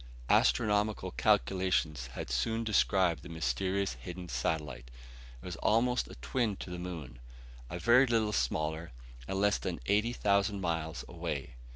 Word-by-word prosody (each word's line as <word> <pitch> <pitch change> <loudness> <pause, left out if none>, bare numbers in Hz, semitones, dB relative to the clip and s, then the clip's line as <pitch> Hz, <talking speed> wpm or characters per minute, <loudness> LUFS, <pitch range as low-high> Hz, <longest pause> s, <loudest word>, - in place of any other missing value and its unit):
Astronomical 105 - +2
calculations 80 -4 +1
had 65 - -5
soon 110 - 0
described 95 -7 +2
the - - -10
mysterious 85 +5 -1
hidden 90 +8 -8
satellite. 70 -8 -2 0.5
It - - -14
was 90 -2 -5
almost 125 +3 +2
a - - -10
twin 100 - -1
to 90 - -8
the 90 - -5
moon; 85 -9 -7 0.5
a 90 - -4
very 125 +7 +5
little 110 -3 +1
smaller, 75 +3 -1 0.3
and 95 - -2
less 105 0 +3
than - - -3
eighty 105 - +2
thousand 100 -2 +1
miles 80 -3 -2
away. 80 -7 -4
90 Hz, 145 wpm, -32 LUFS, 75-105 Hz, 0.5 s, very